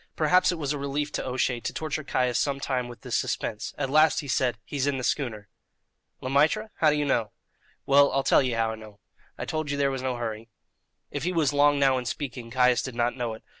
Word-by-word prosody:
Perhaps 180 +4 +4
it 175 - -3
was 145 -2 -2
a 145 - -4
relief 140 +1 -2
to - - -3
O'Shea 125 -1 -1
to 115 - -4
torture 155 -1 -3
Caius 125 -3 0
some 140 -1 0
time 130 -3 -2
with 120 -2 -11
this - - -3
suspense. - - -2
At 135 - -2
last 155 +1 +4
he 145 - -9
said: 125 -3 +1
"He's 140 -1 -2
in 140 -1 0
the 130 - -4
schooner." 115 -7 -2 0.7
"Le 130 - -4
Maître? 160 +11 +2
How 155 - +4
do 150 - +2
you 150 -1 0
know?" 115 -6 0 0.5
"Well, 140 +1 +5
I'll 135 - +1
tell - - +5
ye 130 -3 0
how 115 -1 0
I - - -5
know. 105 -2 -13 0.4
I - - -4
told 155 -2 -3
ye 140 - -1
there 140 -1 +2
was 135 -1 -3
no 130 -1 -1
hurry." 115 -1 -5 0.6
If - - -3
he 180 - -1
was 160 -5 +1
long 145 0 +4
now 135 -2 +3
in 125 - -7
speaking, 125 -3 -5
Caius 125 0 +3
did 130 -3 -6
not 120 0 0
know 120 -3 -3
it. 110 - -16
135 Hz, 245 wpm, -26 LUFS, 120-145 Hz, 0.7 s, Well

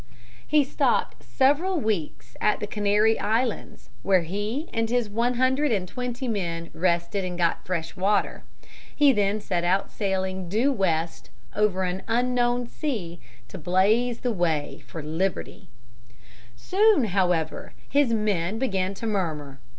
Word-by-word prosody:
] 125 0 -24
He 295 - +6
stopped 270 - 0
several 310 +7 +2
weeks 170 - -3
at 210 - +2
the - - -2
Canary 210 +1 +2
Islands, 225 +2 -2
where 190 -3 +3
he 205 - -3
and 225 0 0
his 240 -2 +1
one 235 +3 +1
hundred 260 +3 +2
and 190 -4 0
twenty 250 +4 -4
men 170 -6 -3
rested 170 +2 0
and 180 -1 -4
got 170 -1 0
fresh 165 -3 -3
water. 200 +3 0 0.5
He 285 -2 +5
then 205 -1 +1
set 180 -4 -2
out 185 +3 +1
sailing 190 -2 -2
due 230 +9 +2
west 170 -8 -1 0.3
over 200 -3 +1
an 185 +1 -2
unknown 245 +1 +1
sea 215 - -4 0.3
to 115 - -9
blaze 210 +8 +2
the 245 -2 0
way 160 -6 -1
for 160 - -7
liberty. 180 +3 -3 0.9
Soon, 390 - +3
however, 180 -6 0
his 280 -3 +2
men 210 -3 0
began 195 -6 -1
to 230 - -6
murmur. 155 -10 -2
205 Hz, 145 wpm, -25 LUFS, 175-240 Hz, 0.9 s, He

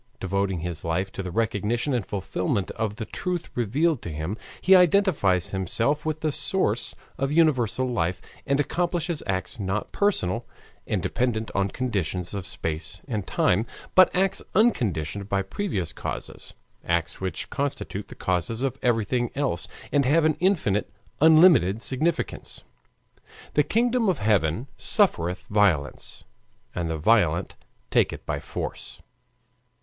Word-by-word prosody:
Devoting 95 -2 -1
his 85 -1 -5
life 85 +4 -1
to - - -5
the 95 - -5
recognition 115 +6 0
and 120 -4 0
fulfillment 95 0 -2
of 110 -2 -3
the 110 -1 -5
truth 180 +6 -3
revealed 135 +6 +1
to - - -6
him, 80 +6 -3 0.2
he 190 +1 +6
identifies 175 - +3
himself 115 - 0
with 155 0 -2
the 155 - +1
source 115 - 0 0.2
of 135 0 0
universal 130 -6 +2
life 90 -8 -1 0.3
and 140 +1 +2
accomplishes 170 +1 -1
acts 95 +3 -3
not 100 +1 -2
personal, 120 - 0 0.4
and - - -1
dependent 115 -3 -1
on 100 0 +1
conditions 95 -8 -2
of 100 -3 -4
space 80 +4 -4
and 105 -7 -3
time, 105 +6 +2 0.3
but 185 0 +7
acts 195 +1 +1
unconditioned 100 - +1
by 100 -1 +1
previous 95 - -3
causes, - - -7 0.3
acts 85 0 -1
which 95 -1 -4
constitute 135 -7 -3
the - - -10
causes 95 - -1
of 135 -3 -2
everything 120 0 +1
else, 135 - -1 0.2
and 145 - +3
have 155 +4 +4
an 155 - +4
infinite, 155 - +1 0.3
unlimited 155 - +6
significance. 150 +8 -1 0.9
"The 150 - +4
kingdom 230 - +2
of 180 - +1
heaven 105 - +1
suffereth 90 - +2
violence, 90 - 0 0.5
and 85 -2 -2
the 80 - -2
violent 85 -2 +2 0.4
take - - +3
it - - -9
by - - -2
force." - - -6
110 Hz, 140 wpm, -25 LUFS, 95-150 Hz, 0.9 s, but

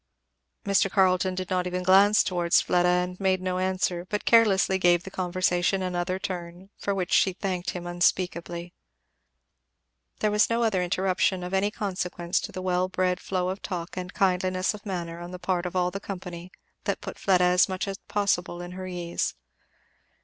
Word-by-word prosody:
Mr. 195 0 +3
Carleton 185 -1 +2
did 185 -1 -5
not 180 -1 +1
even 180 0 -3
glance 195 +3 +6
towards 175 -2 +2
Fleda 180 0 +2
and 180 0 0
made 190 -1 +2
no 185 0 -2
answer, 185 -2 0
but 210 - -2
carelessly 200 -4 +4
gave 175 -1 +4
the 190 - -9
conversation 185 +1 0
another 180 0 -1
turn; 180 0 -6
for 200 - -2
which 185 -1 -2
she 190 - +4
thanked 185 -1 -3
him 175 -1 -5
unspeakably. 175 0 -1 1.4
There 215 - +1
was 210 +1 +3
no 230 +1 +1
other 210 -5 +1
interruption 185 0 0
of 180 +1 -6
any 195 +2 +2
consequence 180 -4 -2
to - - -6
the 185 - -6
well 185 0 +1
bred 185 -1 0
flow 185 -1 -2
of 190 +2 -4
talk 175 -3 -5
and 180 0 -5
kindliness 185 0 +1
of 210 0 -10
manner 170 -3 -4
on 175 0 -7
the 180 - -7
part 180 -1 -1
of 180 - -8
all 180 0 +1
the 195 - -5
company, 180 -3 -7 0.3
that - - -1
put - - -7
Fleda 185 -2 +3
as 180 +1 +4
much 185 +1 -3
as 195 0 -5
possible 200 -4 0
at 175 - -8
her 185 0 -6
ease. 175 -2 -3
185 Hz, 180 wpm, -26 LUFS, 180-190 Hz, 1.4 s, glance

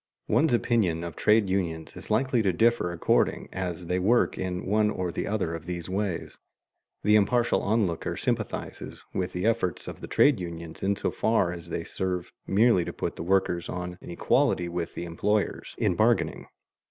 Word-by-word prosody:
One's 160 0 +3
opinion 110 -9 +1
of 85 -2 -6
trade 105 -1 +3
unions 85 -4 -2
is 95 - -8
likely 120 +2 +2
to 100 -3 +2
differ 115 -1 +2
according 85 - +1
as 90 -2 -4
they 90 +2 0
work 115 +6 +3
in 90 -1 -3
one 105 +1 +2
or 90 -4 -2
the - - -3
other 100 -6 -1
of 85 0 -7
these 90 -1 -4
ways. 95 -3 -3 0.6
The 105 +1 +5
impartial 120 +3 +3
onlooker 100 -6 0
sympathizes - - -3
with 90 -1 -1
the 90 +3 -2
efforts 115 -6 0
of - - -7
the - - -6
trade 140 -7 +4
unions 85 -2 -7
in 100 +1 +1
so 100 - -1
far 100 -6 +1
as 85 -1 -9
they - - -3
serve 90 -2 -3 0.2
merely 105 -2 +4
to - - -5
put - - -3
the - - -7
workers 90 -1 +1
on 90 0 -5
an - - -10
equality 85 0 +2
with 85 -1 -4
the - - -4
employers 100 +5 -1
in - - +2
bargaining. - - +1
95 Hz, 180 wpm, -27 LUFS, 85-105 Hz, 0.6 s, The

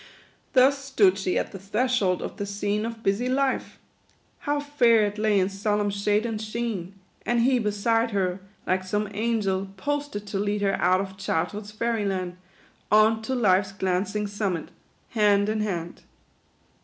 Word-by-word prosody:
u - - -18 0.5
Thus 275 +1 +4
stood 205 -8 +3
she 185 -1 0
at - - -2
the 195 - -8
threshold 205 -1 0
of - - -6
the 200 - -3
scene 205 +2 -1
Of 230 -1 -8
busy 205 +6 +1
life. 270 0 0 0.6
How 290 0 -1
fair 240 -7 +3
it 205 +1 -4
lay 210 -2 +3
in 185 - +2
solemn 205 +1 0
shade 205 +2 +1
and 220 -2 -3
sheen! 215 -4 -4 0.3
And 240 0 +1
he 255 +1 +3
beside 225 +2 +1
her, 190 -3 -1 0.3
like 185 +1 +1
some 210 +3 -1
angel, 205 -3 0
posted 290 -4 -3
To 200 -1 -3
lead 205 0 -1
her 195 - +2
out 185 +2 +4
of 190 -1 -7
childhood's 200 +3 -2
fairy 225 0 -1
land, 185 -2 -2 0.5
On 220 +1 +5
to 260 +4 -2
life's 195 -4 +2
glancing 190 +2 -1
summit, 200 -5 -2 0.4
hand 205 -2 +3
in 215 0 0
hand." 175 -5 -3
210 Hz, 165 wpm, -25 LUFS, 195-230 Hz, 0.6 s, On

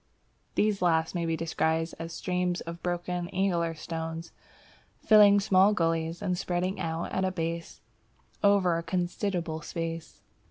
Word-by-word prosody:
(These 210 -2 +1
last 165 -2 +2
may 170 -2 -1
be 165 0 0
described 160 0 0
as 165 0 -5
streams 180 +1 -1
of 170 +1 -7
broken, 175 0 -2
angular 175 -3 0
stones, 165 +1 -5 0.7
filling 205 -2 +6
small 195 +1 +4
gullies, 165 +1 0
and 185 -3 0
spreading 180 +2 -2
out 165 -1 -3
at 190 - -1
the 190 0 +1
base 165 -1 -4 0.6
over 190 -4 +4
a - - -3
considerable 175 -2 -2
space.) 165 +1 -5
175 Hz, 135 wpm, -28 LUFS, 165-185 Hz, 0.7 s, filling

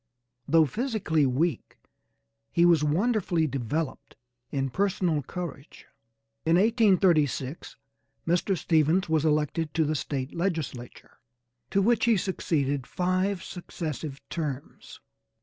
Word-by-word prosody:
Though 160 +1 +5
physically 170 - 0
weak 140 +2 -1 0.7
he 170 - +4
was 170 -4 +5
wonderfully 175 +1 +1
developed 135 +2 -3 0.3
in 135 -2 -2
personal 180 -3 0
courage. 145 -1 -8 0.6
In 165 +1 +3
1836 180 - +2 0.5
Mr. 175 +3 +1
Stephens 160 +3 +2
was 160 -1 +2
elected 150 +1 0
to 160 - +3
the 155 - 0
State 135 -2 -3
legislature, 160 -9 -4 0.5
to 195 - +2
which 225 +1 +3
he 230 -3 +4
succeeded 145 -8 -1
five 185 +1 0
successive 155 -5 -6
terms. 145 -5 -6
160 Hz, 105 wpm, -27 LUFS, 145-185 Hz, 0.7 s, Though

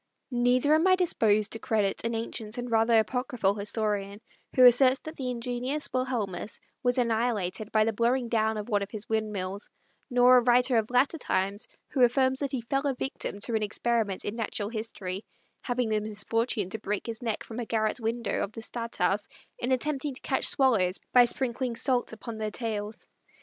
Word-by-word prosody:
Neither 250 +4 +3
am 320 +4 +4
I 370 - +6
disposed 215 - +2
to 225 - -5
credit 210 -3 0
an 230 0 -1
ancient 225 0 -4
and 245 -1 -4
rather 225 0 +4
apocryphal 235 -2 +1
historian 205 -1 -2 0.4
who 255 - +7
asserts 255 +2 +6
that 315 +1 -8
the 255 -2 -3
ingenious 250 +4 -3
Wilhelmus 230 -7 -2 0.2
was 245 0 +1
annihilated 225 -4 0
by 215 -1 +4
the 225 +1 0
blowing 240 +3 +1
down 220 -1 +1
of 210 - -5
one 205 -4 +1
of 200 - -4
his 210 -1 -7
windmills; 205 -3 -3 0.4
nor 250 0 +6
a - - +5
writer 245 0 +4
of 220 - -3
latter 265 +6 +2
times, 200 -2 -1 0.2
who 265 - -1
affirms 260 +2 +3
that 280 - -1
he 260 - -2
fell 275 +4 -1
a 270 - 0
victim 250 -5 -3
to 235 - -2
an 220 - +1
experiment 215 -1 -1
in 205 - -3
natural 215 -2 -3
history, 215 -4 -5 0.4
having 245 -2 -1
the 215 -1 +2
misfortune 215 -1 -1
to 220 - -3
break 210 -1 -3
his 230 0 -6
neck 225 -3 -2
from 225 +1 -7
a 240 - -3
garret 220 +1 0
window 230 0 -2
of 200 - -5
the 225 - -7
stadthouse 225 -3 -1 0.3
in 245 - -2
attempting 275 +1 0
to - - -8
catch - - +1
swallows 215 -10 +3
by 245 -1 +8
sprinkling 245 0 -2
salt 245 +1 0
upon 225 0 -7
their 215 -1 -1
tails. 215 -1 -5
230 Hz, 185 wpm, -28 LUFS, 215-250 Hz, 0.4 s, by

